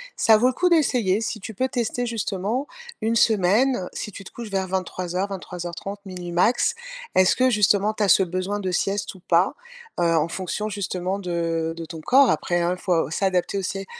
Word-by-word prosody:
Ça 220 -1 +5
vaut 230 - +1
le 255 - +1
coup 360 +7 +2
d'essayer, 250 - +2
si 225 -1 -3
tu 215 +2 -8
peux 260 +6 0
tester 245 -1 -2
justement 225 +3 -2 0.3
1 225 +1 0
semaine, 215 +1 +3
si 210 - -6
tu 200 - -10
te - - -12
couches 235 -2 -8
vers 190 -1 -1
23:00-23:30, 185 0 -4
00:00 180 -2 -7
max, 220 - +2 0.4
est-ce 185 0 +5
que 255 +1 +3
justement, 210 -2 +3
tu 215 - 0
as - - +2
ce 195 - +6
besoin 185 +3 -2
de 190 -2 -2
sieste 195 +3 -1
ou - - -13
pas? 175 +2 +2 0.4
Heu, 170 -1 +3
en 155 0 +2
fonction 190 +4 -3
justement 190 -2 -3
de 165 -3 -2
de 165 0 -6
ton 160 -1 -8
corps 265 - +5
après, 175 -1 0
hein, 170 +1 +1
il - - -16
faut 165 -6 +1
s'adapter 190 +2 0
aussi 195 +1 -4
195 Hz, 195 wpm, -23 LUFS, 180-220 Hz, 0.4 s, ce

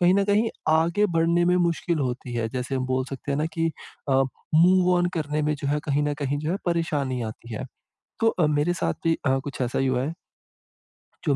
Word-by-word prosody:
कहीं 180 +1 +5
न 200 0 +3
कहीं 210 +3 +2 0.2
आगे 165 +6 +3
बढ़ने 170 +1 +3
में 180 +1 +3
मुश्किल 170 -1 +1
होती 125 -2 -3
है। 115 -1 -1
जैसे 130 +2 -3
हम 130 - -1
बोल 130 0 0
सकते 135 +1 -4
हैं 140 - 0
न 155 - +1
कि 165 0 +1 0.4
अ, 135 0 +4 0.3
मूव 180 +2 +5
ओन 175 0 +2
करने 150 -1 -1
में 150 0 +1
जो 145 -1 -4
है 150 +1 +1
कहीं 145 0 +1
न 145 0 0
कहीं 145 -1 -2
जो 150 +2 -2
है 185 - 0
परेशानी 150 -7 0
आती 115 +1 -10
है। 105 - -4 0.6
तो 225 - +4
अ, 175 -7 +2
मेरे 150 +3 +2
साथ 80 - 0 0.3
अ, - - +4
भी 135 0 +2
कुछ 140 -2 -7
ऐसा 125 - -1
ही 135 - +1
हुआ 130 -1 +1
है। 155 +4 -3 1.1
जो 140 - +3
150 Hz, 225 wpm, -25 LUFS, 135-170 Hz, 1.1 s, कहीं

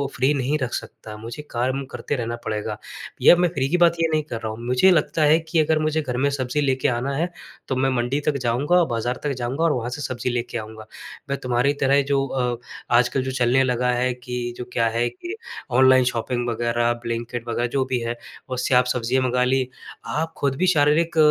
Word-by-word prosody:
Free 130 +4 +2
नहीं 140 +2 0
रख 125 - -3
सकता, 105 -1 -7
मुझे 115 +7 -8
काम 130 +3 -1
करते 145 - -3
रहना 120 -2 -3
पड़ेगा। 105 0 -3 0.4
या - - +8
मैं 175 0 +2
फ़्री 135 -5 -1
की 180 - +2
बात 170 -1 +5
ये 165 - +3
नहीं 155 -1 +1
कर 120 -7 -6
रहा 110 - -3
हूँ 115 +2 -8
मुझे 125 +10 +4
लगता 160 -1 +2
है 150 +2 +5
कि 160 0 -1
अगर 155 0 +3
मुझे 155 0 0
घर 125 -4 -3
में 140 +3 +2
सब्ज़ी 140 0 -1
लेके 135 0 +1
आना 130 +2 -1
है 170 +5 0 0.4
तो 135 - -1
मैं 135 +1 +2
मंडी 125 +2 0
तक 145 -2 +2
जाऊँगा, 140 +9 +2
बाज़ार 120 -2 -2
तक 145 - 0
जाऊँगा 130 +4 -2
और 165 - +4
वहाँ 120 -2 -2
से 125 +4 -5
सब्ज़ी 125 -2 -3
लेके 120 0 -3
आऊँगा। 110 0 -8 0.4
मैं 140 - -1
तुम्हारी 125 +3 +2
तरह 140 +1 +4
जो 135 -1 +2
अ, 125 -2 -1 0.4
आजकल 125 +2 +2
जो 130 - -3
चलने 130 +1 +3
लगा 125 -1 +1
है 125 +1 +1
कि 125 -1 -5
जो 125 - -5
क्या 115 -1 +2
है 120 +1 +2
कि 345 - -7 0.4
ऑनलाइन 130 0 +6
शॉपिंग 120 +1 -2
वग़ैरह, 120 +1 +1
ब्लिंकिट 115 0 -4
वग़ैरह, 120 +1 0
जो 130 +2 0
भी 125 - +2
है 115 0 -3 0.3
उससे 125 0 0
आप 125 0 +5
सब्ज़ियाँ 125 +2 +1
मँगा 125 0 +1
ली। 130 0 +1 0.4
आप 160 +2 -2
खुद 140 -2 0
भी 185 +6 +1
शारीरिक 155 +3 +2
130 Hz, 215 wpm, -23 LUFS, 120-145 Hz, 0.4 s, या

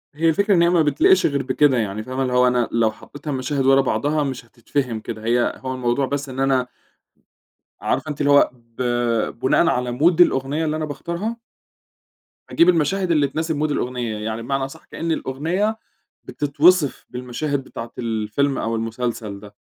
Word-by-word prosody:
هي 165 +2 +2
الفكرة 200 +6 +2
إن 170 - +4
هي 170 - +4
ما 175 -1 +3
بتليقش 350 - +4
غير 140 -2 0
بكده 130 +1 +3
يعني 105 -1 -2
فاهمة؟ 130 +3 -4
اللي 130 -1 -1
هو 125 0 +4
أنا 125 -1 +1
لو 115 -1 +2
حطيتها 145 +5 -9
مشاهد 135 +1 -1
ورا 135 0 +5
بعضها 145 +3 0
مش 130 -4 -4
هتتفهم 120 +1 -3
كده. 110 0 -7
هي 120 +1 +2
هو 130 0 -5
الموضوع 125 +1 0
بس 140 +1 -3
إن 130 0 -6
أنا 135 -2 +2 1.1
عارفة 155 - -1
أنتِ 150 0 -4
اللي 145 0 +3
هو 145 - +6 0.3
ب - - -4 0.6
بناءً 130 +7 +3
على 125 0 -1
mood 170 +3 +4
الأغنية 145 0 +2
اللي 155 0 -1
أنا 155 - -2
باختارها 170 - -4 1.1
هاجيب 170 - +4
المشاهد 180 +2 +1
اللي 150 -3 +3
تناسب 160 0 -2
mood 155 - -1
الأغنية 125 -5 -2
يعني 110 +1 -4
بمعنى 135 +3 -1
أصح 160 +5 -12
كأن 165 0 -4
الأغنية 170 +11 -1 0.5
بتتوصف 150 +2 +2
بالمشاهد 130 +3 -3
بتاعة 115 -2 -8
الفيلم 115 +4 -1
أو 115 0 -1
المسلسل 115 -2 -4
ده. 105 0 -14
135 Hz, 175 wpm, -21 LUFS, 125-155 Hz, 1.1 s, هو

